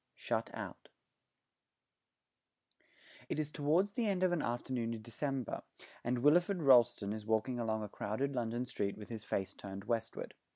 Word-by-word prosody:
SHUT - - -1
OUT - - -7 2.4
It - - -1
is 150 -1 -1
towards 160 +8 +2
the 230 -1 0
end 190 -2 +1
of 185 - +4
an 175 -3 +1
afternoon 120 -1 -1
in 110 - -9
December, 130 +2 -2 0.4
and 120 0 0
Wilfred 175 +4 +4
Rolleston 120 -6 +6
is 110 -1 -5
walking 110 +3 +1
along 110 -2 0
a - - -3
crowded 120 +7 -2
London 120 0 -1
street 100 -5 -2
with 105 - -9
his 110 -2 -5
face 95 -2 -2
turned 100 -1 -7
westward. 115 +1 -2
120 Hz, 155 wpm, -35 LUFS, 110-145 Hz, 2.4 s, Rolleston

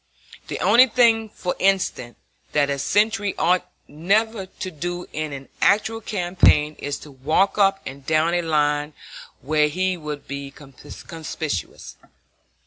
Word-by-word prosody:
The - - -4
one 250 +2 +6
thing, 225 -2 +3
for 180 -3 -4
instance, 190 -11 0 0.4
that 145 -1 +2
a 140 - -2
sentry 205 +4 +1
ought 180 +2 +1 0.2
never 200 +6 0
to 185 0 -7
do 175 +3 -5
in 155 0 -3
an 135 -1 -8
actual 220 +2 +2
campaign 175 -6 +2
is 145 0 -3
to 150 - -12
walk 155 +10 +1
up 195 -1 +4
and 135 +1 -8
down 155 +3 +1
a 175 - +2
line 150 -2 0 0.5
where 150 +3 +2
he 185 +4 -1
will 150 -2 -5
be 140 -1 -7
conspicuous. 150 - -7
165 Hz, 135 wpm, -22 LUFS, 145-195 Hz, 0.5 s, one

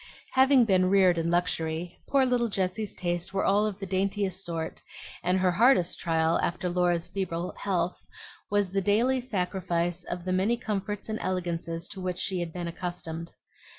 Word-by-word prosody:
Having 265 -1 +5
been 185 -3 +3
reared 185 -3 +5
in 165 0 0
luxury, 170 -1 -1
poor 275 -1 +4
little 245 -2 +2
Jessie's 195 +1 -2
tastes 175 -1 -2
were 195 - +1
all 205 +2 +3
of 205 -3 -4
the 200 - -5
daintiest 195 0 -1
sort; 165 -2 -4 0.4
and 180 +2 +2
her 185 -1 +3
hardest 200 -2 +4
trial, 165 -1 +2
after 180 +1 -1
Laura's 175 -1 +1
feeble 180 -3 -3
health, 180 -3 -1 0.4
was 205 -2 +1
the 195 0 +1
daily 235 +7 +2
sacrifice 180 -5 -1
of 175 0 -5
the 185 - 0
many 200 +6 +2
comforts 210 -2 -3
and 220 0 -3
elegances 170 -2 -2
to 190 - -6
which 180 -1 -2
she 190 -1 -1
had 170 -1 -3
been 175 0 -4
accustomed. 170 -1 -5
185 Hz, 170 wpm, -28 LUFS, 175-200 Hz, 0.4 s, Having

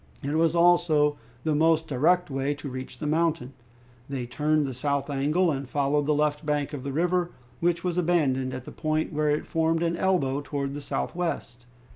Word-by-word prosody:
It 140 +2 -2
was 165 +1 +2
also 170 -4 +4 0.2
the 155 - +1
most 160 +1 +3
direct 160 +5 +2
way 135 +2 -1
to 145 0 -7
reach 130 0 -7
the 155 - -5
mountain. 155 -4 0 0.6
They 135 -3 -3
turned 150 +4 +1
the 135 - -4
south 140 +2 -1
angle 155 +6 +2
and 135 -2 -4
followed 145 +1 +1
the 150 - +3
left 150 0 0
bank 150 -1 -1
of 145 - -4
the 140 - -3
river, 175 +4 +1 0.3
which 170 0 +1
was 180 -1 0
abandoned 140 -7 +1
at 130 -1 -6
the - - -8
point 155 0 -1
where 150 0 +1
it 150 +1 0
formed 165 0 +1
an 170 0 0
elbow 170 -7 +1
towards 140 -1 -3
the 145 - -5
southwest. 140 -6 -3
150 Hz, 190 wpm, -26 LUFS, 140-165 Hz, 0.6 s, also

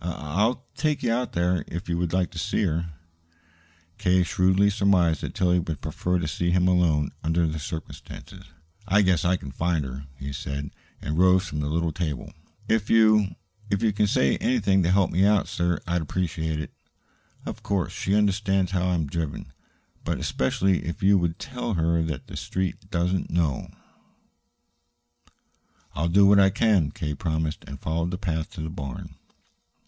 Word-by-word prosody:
I 90 - -2
I'll 105 - -1
take 150 -2 -1
you 115 -2 +2
out 125 +1 -2
there, 85 -1 +1
if 85 +4 -6
you 85 - -1
would 85 -2 -1
like 90 -1 0
to 85 - -6
see 105 +3 0
her." 85 -2 -1 1.1
K. 90 0 +3
shrewdly 95 +3 +3
surmised 95 -6 +2
that - - -5
Tillie 90 -1 +2
would 80 -4 -4
prefer 90 +6 -1
to 85 -3 -2
see 85 +3 -1
him 90 +1 +3
alone, 85 -5 +2
under 80 +1 +2
the 80 0 -2
circumstances. 80 +2 -8 0.4
"I 100 +2 +4
guess 95 -3 +2
I 90 +2 +3
can 70 -6 -7
find 80 +1 0
her," 65 +2 -7
he 70 +1 -6
said, 70 +1 -5 0.3
and 75 +2 -2
rose 95 +1 +5
from 75 -3 -4
the 75 0 -2
little 85 +1 0
table. 75 -5 -4 0.3
"If 110 -2 +1
you 110 -3 +4 0.3
if 100 +2 0
you 110 -2 +3
can 105 +1 +2
say 70 -9 +2
anything 100 -6 +2
to 85 - +1
help 95 0 +3
me 90 +4 +2
out, 105 -1 +3
sir, 85 0 0
I'd 85 0 0
appreciate 80 -1 -2
it. 75 - -6 0.7
Of - - -6
course, 95 -4 -1
she 95 - 0
understands 95 -2 +1
how 90 -1 0
I 90 - +2
am 80 -2 0
driven. 80 +1 -4 0.5
But - - -1
especially 90 +8 0
if 85 +4 -5
you 100 0 +5
would 85 -1 -1
tell 125 -4 -4
her 85 0 +2
that 80 -5 -3
the - - -10
Street 95 0 -3
doesn't 90 0 0
know 80 -5 0 1.1
" - - -39
"I'll 80 +4 -1
do 100 +3 +5
all 100 0 +6
I 95 - +6
can," 100 -6 +2
K. 80 -7 -4
promised, 80 0 -2
and 70 - -8
followed 85 +2 -1
the 90 - -3
path 80 -5 -2
to 90 - -6
the 80 - -4
barn. 70 -7 -7
90 Hz, 185 wpm, -25 LUFS, 80-95 Hz, 1.1 s, all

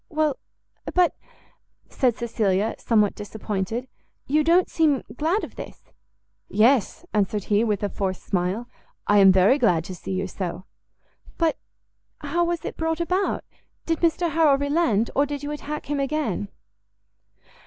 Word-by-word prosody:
"Well, 310 -3 0 0.6
but," 360 -1 +4 0.7
said 250 -4 +1
Cecilia, 220 -3 0
somewhat 210 -3 +2
disappointed, 210 +3 -4 0.4
"you 300 +3 +2
don't 345 +3 +4
seem 305 -5 +2
glad 330 - 0
of - - -8
this?" - - -10 0.6
"Yes," 240 - +2
answered 205 0 0
he, 205 +2 +4
with 210 -3 -1
a 205 - 0
forced 190 -2 -3
smile, 190 +5 -1 0.4
"I 205 0 +4
am 195 -1 +8
very 190 +9 +4
glad 175 - +3
to 185 - -7
see 190 - -6
you 190 +1 -1
so." 185 -1 -5 0.7
"But 330 -2 +2 0.6
how 345 0 0
was 345 -1 -2
it - - -5
brought 325 0 -1
about? 365 +3 0 0.4
did 330 -1 0
Mr 335 0 +1
Harrel 310 -3 +4
relent? 285 -7 +1
or 285 +1 +3
did 290 0 -5
you 290 - -3
attack 300 0 -5
him 290 -1 -2
again?" 275 - -1
255 Hz, 145 wpm, -24 LUFS, 205-310 Hz, 0.7 s, am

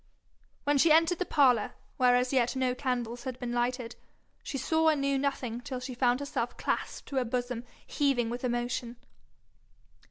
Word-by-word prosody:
When 290 -1 +2
she 325 +3 +5
entered 330 +2 +4
the 365 - -1
parlour, 250 -7 +3 0.2
where 250 -1 +5
as 250 +1 +1
yet 250 -1 +2
no 260 -1 +1
candles 245 -2 -3
had 255 -2 -4
been 245 -2 -4
lighted, 240 0 -1 0.5
she 275 - -5
saw 320 +4 +1
and 305 -2 +2
knew 275 0 +1
nothing 255 -4 -2
till 255 0 -5
she 255 0 -6
found 245 +1 +2
herself 285 - -3
clasped - - -3
to 275 - -3
a - - +1
bosom 245 0 -3 0.2
heaving 255 -5 +1
with 245 +1 -5
emotion. 240 -1 -2
255 Hz, 170 wpm, -30 LUFS, 245-275 Hz, 0.5 s, she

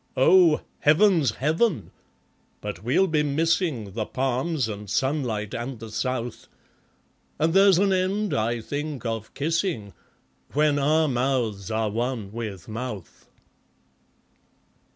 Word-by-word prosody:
Oh, 165 +3 +5 0.2
Heaven's 155 - +4
Heaven! 160 - 0 0.7
but 105 -3 -6
we'll 155 +12 +3
be 155 -4 +1
missing 150 - 0
The 110 -2 -3
palms, 130 +2 -1
and 105 -1 -7
sunlight, 120 -4 -1
and 120 +2 -4
the 110 0 -9
south; 125 0 -3 0.9
And 160 +1 +1
there's 195 -1 +6
an 195 +1 +3
end, 190 +3 0
I 115 +2 0
think, 145 +2 -5
of 115 -2 -4
kissing, 160 - -1 0.6
When 150 0 +2
our 155 +3 +3
mouths 120 -6 -1
are 110 -1 -1
one 115 -2 -3
with 105 -5 -6
Mouth. 110 -4 -7
130 Hz, 115 wpm, -25 LUFS, 110-160 Hz, 0.9 s, there's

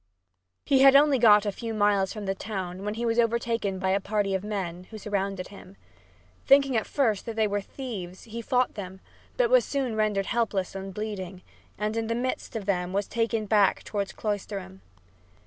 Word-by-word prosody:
He 270 - +4
had 275 0 +8
got - - +11
only 285 -3 +2
a 210 -2 +6
few 225 +2 -5
miles 205 -2 +2
from 210 -2 -6
the 195 - 0
town 190 -2 -5
when 210 +1 -3
he 235 +1 -2
was 230 0 +1
overtaken 230 -4 0
by 190 0 0
a 195 - +2
party 200 0 -1
of 190 0 -1
men, 185 -4 -4
who 220 - -10
surrounded 195 -2 -3
him. 195 -1 -13 0.7
Thinking 275 -1 +5
at 220 - 0
first 230 -8 0
that 230 - -4
they 220 -1 +2
were 205 -1 -1
thieves, 195 -6 -7
he 230 +1 -7
fought 250 +2 +1
them, 190 -2 -7 0.4
but - - +2
was - - +6
soon 265 -5 -2
rendered 210 -2 +1
helpless 210 -5 -1
and 195 0 -6
bleeding, 190 -3 -6 0.3
and 210 +2 -2
in 225 -1 -1
the 230 - -1
midst 255 0 -3
of 215 -3 -4
them 180 -2 -1
was 200 0 0
taken 230 -1 -1
back 205 -2 +3
toward 200 -2 -3
Cloisterham. 200 - -4
210 Hz, 195 wpm, -27 LUFS, 195-230 Hz, 0.7 s, got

